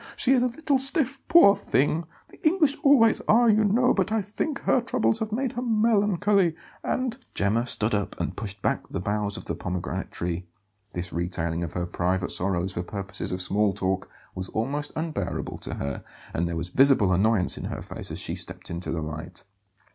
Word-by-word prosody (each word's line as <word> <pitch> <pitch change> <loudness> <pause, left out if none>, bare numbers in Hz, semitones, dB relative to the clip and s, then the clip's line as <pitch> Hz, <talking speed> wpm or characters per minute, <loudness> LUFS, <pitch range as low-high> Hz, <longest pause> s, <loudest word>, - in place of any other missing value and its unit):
She 265 - +3
is 255 - +4
a 250 - +3
little 275 +2 0
stiff, 270 0 +2
poor 260 -12 +7
thing; 165 -3 0 0.2
the - - -19
English 310 -3 +3
always 250 -6 +5
are, 235 +2 +5
you 215 -1 +4
know; 235 +5 +3
but 195 +1 0
I 220 - +2
think 275 +9 -3
her 255 - +2
troubles 235 -2 0
have 220 -1 -3
made 250 +3 -1
her 245 - -3
melancholy, 205 -6 +2 0.3
and 255 -2 -1
" - - -27
Gemma 110 +5 +1
stood 110 -1 +1
up 100 -2 -2
and - - -2
pushed 100 -2 -6
back - - 0
the - - -4
boughs 105 +2 -1
of - - -8
the - - -2
pomegranate 90 -1 -4
tree. 85 +1 -4 0.5
This 90 0 -5
retailing 85 -1 -1
of 85 - -4
her 90 -1 -2
private 90 +1 -1
sorrows 95 0 -1
for 85 - -2
purposes 95 +1 -5
of 90 0 0
small 100 +1 +2
talk 95 0 -2 0.2
was 90 0 -6
almost 145 +6 -2
unbearable 160 0 -3
to - - -4
her, 70 -1 -4 0.3
and 85 +2 0
there 85 -1 -3
was 85 +2 -3
visible 130 -8 +4
annoyance 100 +1 +3
in - - -6
her - - -5
face - - -5
as - - -5
she - - -1
stepped - - -6
into 85 +1 -4
the 80 -2 -2
light. 80 +3 -7
115 Hz, 200 wpm, -26 LUFS, -, 0.5 s, poor